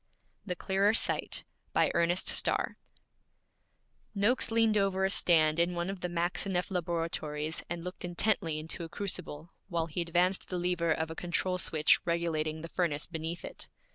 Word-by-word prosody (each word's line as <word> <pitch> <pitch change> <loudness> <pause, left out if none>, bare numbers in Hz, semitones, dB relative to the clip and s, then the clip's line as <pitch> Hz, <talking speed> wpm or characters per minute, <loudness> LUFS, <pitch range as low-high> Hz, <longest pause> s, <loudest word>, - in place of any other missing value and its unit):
THE 180 - -2
CLEARER 195 +4 +2
SIGHT - - 0 0.3
BY - - +3
ERNEST 170 +2 +1
STARR - - +2 1.4
Noakes 210 +6 +2
leaned 225 -1 +3
over 195 -2 +2
a 190 - +2
stand 160 -4 +5
in 175 +1 +2
one 175 +2 -2
of 195 - -7
the 180 - -3
Maxineff 180 +2 -1
laboratories 165 -3 -1
and 170 -1 -4
looked 180 +1 -7
intently 175 -2 0
into 160 +2 -4
a 165 - -7
crucible, 170 -4 -4 0.2
while 170 -3 0
he 165 +2 -3
advanced 175 +3 +1
the 180 - -2
lever 175 -2 0
of 160 0 -1
a - - -6
control 180 +1 -1
switch 155 -3 +4
regulating 160 -2 -1
the - - -5
furnace 165 -4 -1
beneath 165 0 -5
it. - - -8
175 Hz, 160 wpm, -31 LUFS, 165-185 Hz, 1.4 s, stand